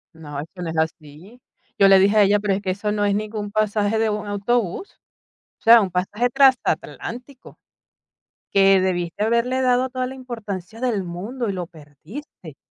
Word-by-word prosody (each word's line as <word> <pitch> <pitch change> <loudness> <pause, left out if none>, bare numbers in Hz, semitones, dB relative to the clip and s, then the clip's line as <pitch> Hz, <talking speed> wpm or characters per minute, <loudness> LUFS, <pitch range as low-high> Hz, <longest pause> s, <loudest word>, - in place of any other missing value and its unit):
No, 145 -3 -8
es 150 - -6
que 180 - -9
no 170 - -4
es 160 - -5
así. 160 +8 -5 0.4
Yo 195 -1 +6
le 195 0 +7
dije 200 +3 +3
a 210 - +7
ella: 205 +1 +3
"Pero 205 -1 0
es 195 - -2
que 195 - -4
eso 210 +3 -2
no 205 -1 -1
es 205 -1 +2
ningún 210 0 -4
pasaje 215 0 0
de 225 0 +1
un 210 0 -3
autobús, 205 - -2 0.7
o - - -34
sea, 230 +1 +8
un 195 -3 -1
pasaje 190 +7 -1
transatlántico, 255 0 -1 0.9
que 195 -1 +5
debiste 175 0 -2
haberle 235 +4 +1
dado 255 0 +2
toda 255 0 -3
la 260 - -8
importancia 225 -5 -7
del 235 -6 0
mundo 205 +8 -5
y 200 - -2
lo 180 -2 -5
perdiste". 160 - -12
205 Hz, 185 wpm, -22 LUFS, 185-235 Hz, 0.9 s, sea